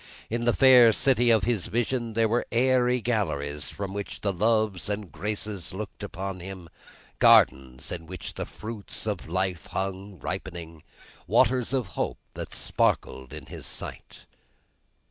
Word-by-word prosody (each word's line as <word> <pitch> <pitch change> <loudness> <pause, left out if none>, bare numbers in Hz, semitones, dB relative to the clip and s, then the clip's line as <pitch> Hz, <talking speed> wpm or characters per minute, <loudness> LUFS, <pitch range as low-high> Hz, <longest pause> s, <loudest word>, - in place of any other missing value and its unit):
In 120 +1 -1
the 120 - +4
fair 125 -4 +8
city 120 -1 +3
of 110 -4 +5
this 115 -6 0
vision, 120 +2 -1
there 115 0 +3
were 120 +3 0
airy 125 0 +3
galleries 75 -11 -1
from 100 -1 -5
which 100 0 -5
the 100 -1 0
loves 110 0 +1
and 105 -3 -3
graces 100 0 -4
looked 105 0 -6
upon 95 +1 -5
him, 90 -1 -8 0.5
gardens 65 0 +4
in 80 -2 -6
which 90 -1 -6
the - - -5
fruits 110 -1 -7
of 100 -7 -3
life 95 -1 -1
hung 95 0 -4
ripening, 85 -4 -6 0.5
waters 125 -1 +3
of 130 -7 -1
Hope - - -2 0.2
that - - -6
sparkled 65 -1 0
in - - -8
his - - -8
sight. - - -9
100 Hz, 145 wpm, -27 LUFS, 90-115 Hz, 0.5 s, fair